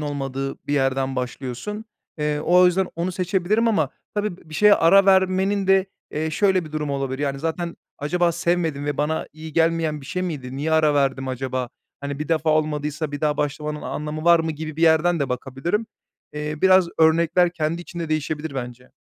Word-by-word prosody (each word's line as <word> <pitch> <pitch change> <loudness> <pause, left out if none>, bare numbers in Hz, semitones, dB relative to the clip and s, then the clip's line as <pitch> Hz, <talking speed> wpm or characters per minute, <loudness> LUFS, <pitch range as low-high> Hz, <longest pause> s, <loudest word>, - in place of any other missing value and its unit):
olmadığı 135 -2 -3
bir - - -2
yerden 135 -1 0
başlıyorsun. 130 - -5 0.3
Eee, 150 -1 -1
o 180 +3 +5
yüzden 185 +1 +2
onu 175 +2 -2
seçebilirim 190 +5 +1
ama 160 -11 +2 0.3
tabii 205 -3 -2
b 170 - -20
bir - - -8
şeye 210 +4 +6
ara 195 +4 +5
vermenin 190 +1 +3
de, 195 0 +4 0.2
eee, 155 +1 -2
şöyle 190 +2 +2
bir 155 - -11
durumu 150 -2 -2
olabilir. 135 -1 -3
Yani, 140 -1 -2
zaten 165 +3 -3 0.2
"Acaba 175 +4 +1
sevmedim 170 -4 -1
ve 145 -1 -2
bana 150 +2 -1
iyi 155 +1 -9
gelmeyen 165 -1 +1
bir 135 - -12
şey 180 +3 -3
miydi? 135 -8 -5
Niye 155 +3 -1
ara 155 -2 +4
verdim 135 -2 0
acaba? 130 -1 -3 0.3
Hani, 140 0 -5
bir 150 - -4
defa 160 -1 +1
olmadıysa 150 0 -1
bir 145 - -4
daha 150 -1 +1
başlamanın 150 +1 -3
anlamı 150 +1 -4
var 170 0 +6
mı?" 160 0 -2
gibi 155 0 -7
bir 165 - -2
yerden 165 +1 +4
de 140 - 0
bakabilirim. 135 - -2 0.5
Eee, 150 0 -4
biraz 185 -2 +5
örnekler 165 +2 +4
kendi 165 +1 -2
içinde 170 -2 -6
değişebilir 155 -1 -2
bence. 125 -1 -7
155 Hz, 185 wpm, -23 LUFS, 145-175 Hz, 0.5 s, şeye